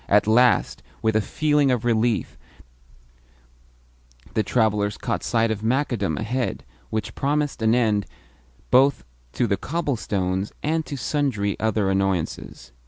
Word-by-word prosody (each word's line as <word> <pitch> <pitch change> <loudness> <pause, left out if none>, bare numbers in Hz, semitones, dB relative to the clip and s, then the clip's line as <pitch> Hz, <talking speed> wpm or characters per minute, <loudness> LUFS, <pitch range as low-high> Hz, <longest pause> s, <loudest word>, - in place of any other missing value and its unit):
At 105 0 +4
last, 120 +3 +3 0.2
with 110 -1 +2
a 110 - +4
feeling 150 +4 +1
of 125 -2 0
relief, 115 -1 +1 2.0
the 110 - +2
travellers 105 -3 +1
caught - - -2
sight 115 -1 +1
of 105 -2 -3
macadam 115 - 0
ahead, 120 - -2 0.3
which 110 -1 -3
promised 145 -2 -1
an 110 +1 +3
end 110 -4 +1 0.6
both 130 +1 +4 0.3
to 125 - +1
the 100 -3 0
cobblestones 105 - -2
and 160 +2 0
to 140 - -5
sundry 130 -9 -1
other 110 -2 +1
annoyances. 95 -8 -2
110 Hz, 125 wpm, -23 LUFS, 105-130 Hz, 2.0 s, At